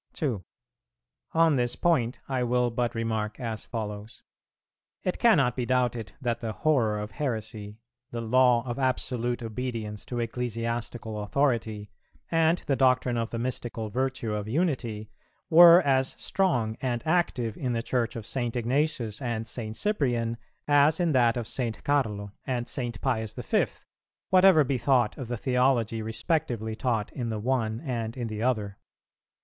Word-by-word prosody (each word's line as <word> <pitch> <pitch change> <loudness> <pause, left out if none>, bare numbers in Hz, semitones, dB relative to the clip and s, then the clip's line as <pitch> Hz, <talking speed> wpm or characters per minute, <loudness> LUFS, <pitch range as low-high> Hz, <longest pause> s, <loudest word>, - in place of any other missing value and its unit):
2. 120 - -2 0.9
On 165 -3 +4
this 120 -1 0
point 130 -8 +1
I 130 -2 -1
will 125 0 +1
but 120 0 -1
remark 110 -1 -2
as 115 -3 -4
follows. 105 -1 -6 0.8
It 180 - -2
cannot 140 - +4
be 125 - -1
doubted 120 -3 0
that 120 -3 -1
the 115 -2 -4
horror 120 -7 +2
of 105 0 -5
heresy, 110 -4 -4 0.3
the 120 - -5
law 120 +1 +3
of 120 +1 -4
absolute 125 -2 -1
obedience 115 -2 -4
to 120 - -3
ecclesiastical 115 -2 -3
authority, 110 -3 0 0.4
and 165 +1 +3
the 140 - +1
doctrine 125 -2 +3
of 115 -1 -1
the 115 - -4
mystical 115 -2 -3
virtue 130 -1 -2
of 105 0 -3
unity, 120 -7 -1 0.4
were 170 +2 +9
as 135 -2 +2
strong 120 - 0
and 120 -3 -1
active 145 -10 +1
in 125 -2 -2
the 115 0 -1
Church 120 -2 -1
of 115 -3 -6
St. 120 -1 -2
Ignatius 125 -1 -1
and 115 -3 -2
St. 110 -1 -5
Cyprian 120 - 0 0.3
as 145 +2 +4
in 175 -2 +2
that 125 -3 +3
of 115 -3 -3
St. 120 -4 -3
Carlo 105 -8 0
and 125 -2 -2
St. 120 -5 -4
Pius 110 -5 -1
the - - -6
Fifth, - - -1 0.5
whatever 185 -4 +7
be 130 -1 -1
thought 120 -3 +2
of 130 - -5
the 120 +1 -3
theology 125 -2 +1
respectively 110 - -2
taught 115 -3 -1
in 120 -3 -3
the 110 - -2
one 115 -1 -1
and 115 -5 -3
in 120 -2 -3
the 110 0 -4
other. 105 -5 -1
120 Hz, 155 wpm, -27 LUFS, 110-130 Hz, 0.9 s, were